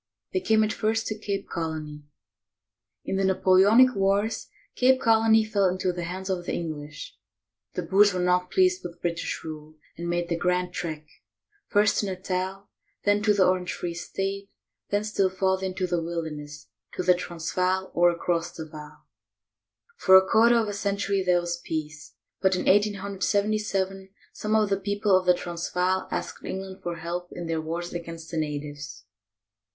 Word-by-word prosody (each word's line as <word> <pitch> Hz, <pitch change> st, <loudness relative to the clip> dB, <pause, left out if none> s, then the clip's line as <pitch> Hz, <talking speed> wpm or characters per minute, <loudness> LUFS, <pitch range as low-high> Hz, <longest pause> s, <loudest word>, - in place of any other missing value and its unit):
They 375 Hz, -, +2 dB
came 220 Hz, -9 st, +3 dB
at 215 Hz, 0 st, 0 dB
first 225 Hz, +1 st, 0 dB
to 215 Hz, 0 st, -4 dB
Cape 200 Hz, -2 st, -3 dB
Colony. 155 Hz, -3 st, -5 dB, 1.0 s
In 195 Hz, -, -1 dB
the 195 Hz, -, +1 dB
Napoleonic 195 Hz, +6 st, +5 dB
wars, 200 Hz, +3 st, +1 dB, 0.3 s
Cape 260 Hz, +1 st, +4 dB
Colony 225 Hz, -1 st, +4 dB
fell 205 Hz, -2 st, +1 dB
into 185 Hz, 0 st, -1 dB
the 175 Hz, -1 st, -4 dB
hands 185 Hz, +2 st, -5 dB
of 185 Hz, -2 st, -2 dB
the -, -, -1 dB
English. 150 Hz, -3 st, -6 dB, 0.6 s
The 180 Hz, -, -2 dB
Boers 200 Hz, +4 st, +5 dB
were 180 Hz, -, -2 dB
not 180 Hz, 0 st, +2 dB
pleased 370 Hz, -1 st, +3 dB
with 170 Hz, 0 st, -8 dB
British 170 Hz, -1 st, -3 dB
rule 155 Hz, -1 st, -8 dB, 0.2 s
and 170 Hz, 0 st, -5 dB
made 175 Hz, 0 st, -1 dB
the 170 Hz, -, -1 dB
"Grand 180 Hz, +1 st, 0 dB
Trek," 155 Hz, -4 st, -4 dB, 0.6 s
first 205 Hz, +1 st, +3 dB
to 205 Hz, -, -1 dB
Natal, 190 Hz, +1 st, -3 dB, 0.4 s
then 205 Hz, 0 st, +3 dB
to 215 Hz, 0 st, +3 dB
the 200 Hz, -2 st, +4 dB
Orange 185 Hz, -1 st, +1 dB
Free 175 Hz, -1 st, -4 dB
State, 195 Hz, +3 st, -4 dB, 0.4 s
then 205 Hz, +1 st, +1 dB
still 200 Hz, -3 st, +1 dB
farther 190 Hz, 0 st, 0 dB
into 185 Hz, 0 st, -2 dB
the 175 Hz, -1 st, -1 dB
wilderness, 150 Hz, -7 st, -6 dB, 0.2 s
to -, -, -3 dB
the 180 Hz, 0 st, +6 dB
Transvaal, 180 Hz, +2 st, -2 dB
or 175 Hz, +1 st, +5 dB
across 170 Hz, 0 st, -1 dB
the 160 Hz, -, -7 dB
Vaal. 150 Hz, -1 st, -12 dB, 0.9 s
For 190 Hz, 0 st, +7 dB
a 190 Hz, 0 st, +4 dB
quarter 235 Hz, +2 st, +5 dB
of 225 Hz, -2 st, +1 dB
a 205 Hz, -, -3 dB
century 200 Hz, -1 st, -1 dB
there 180 Hz, -1 st, +3 dB
was 175 Hz, 0 st, -4 dB
peace; 150 Hz, -7 st, -5 dB, 0.3 s
but 190 Hz, -1 st, +3 dB
in -, -, -1 dB
1877 200 Hz, -1 st, 0 dB, 0.2 s
some 215 Hz, +1 st, -1 dB
of 215 Hz, -2 st, +3 dB
the 195 Hz, -, +2 dB
people 205 Hz, 0 st, +1 dB
of 185 Hz, -1 st, +1 dB
the 180 Hz, -, +6 dB
Transvaal 180 Hz, +2 st, -1 dB
asked -, -, -4 dB
England 190 Hz, 0 st, -6 dB
for 175 Hz, -1 st, -4 dB
help 175 Hz, +2 st, -5 dB
in 175 Hz, -, -6 dB
their 165 Hz, -1 st, -1 dB
wars 170 Hz, +2 st, -4 dB
against 165 Hz, -1 st, -7 dB
the 165 Hz, -, -3 dB
natives. 145 Hz, -3 st, -5 dB
185 Hz, 170 wpm, -26 LUFS, 170-200 Hz, 1.0 s, For